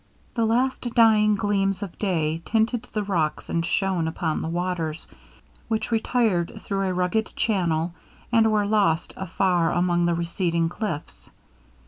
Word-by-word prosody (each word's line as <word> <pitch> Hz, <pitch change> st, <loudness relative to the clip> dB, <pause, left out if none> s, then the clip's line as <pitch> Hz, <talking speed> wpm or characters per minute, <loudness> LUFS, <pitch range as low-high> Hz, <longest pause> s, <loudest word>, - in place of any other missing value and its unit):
The 230 Hz, -2 st, +1 dB
last 255 Hz, +4 st, +1 dB
dying 215 Hz, -3 st, +5 dB
gleams 195 Hz, -1 st, 0 dB
of 195 Hz, -, -7 dB
day 165 Hz, -5 st, 0 dB
tinted 225 Hz, +3 st, 0 dB
the 210 Hz, -, -1 dB
rocks 170 Hz, -6 st, -1 dB
and 165 Hz, -, 0 dB
shone 185 Hz, -2 st, 0 dB
upon 160 Hz, -1 st, -2 dB
the -, -, -3 dB
waters, 170 Hz, -2 st, -3 dB, 0.6 s
which 220 Hz, 0 st, -2 dB
retired 220 Hz, -6 st, +1 dB
through 195 Hz, -1 st, -1 dB
a -, -, 0 dB
rugged 180 Hz, +5 st, 0 dB
channel 170 Hz, -6 st, 0 dB, 0.4 s
and 225 Hz, -2 st, +4 dB
were 210 Hz, -1 st, +2 dB
lost 200 Hz, -6 st, +1 dB
afar 180 Hz, -2 st, +1 dB
among 175 Hz, -1 st, +2 dB
the 170 Hz, -, +1 dB
receding 170 Hz, -1 st, 0 dB
cliffs. 160 Hz, -, -5 dB
190 Hz, 140 wpm, -24 LUFS, 170-215 Hz, 0.6 s, dying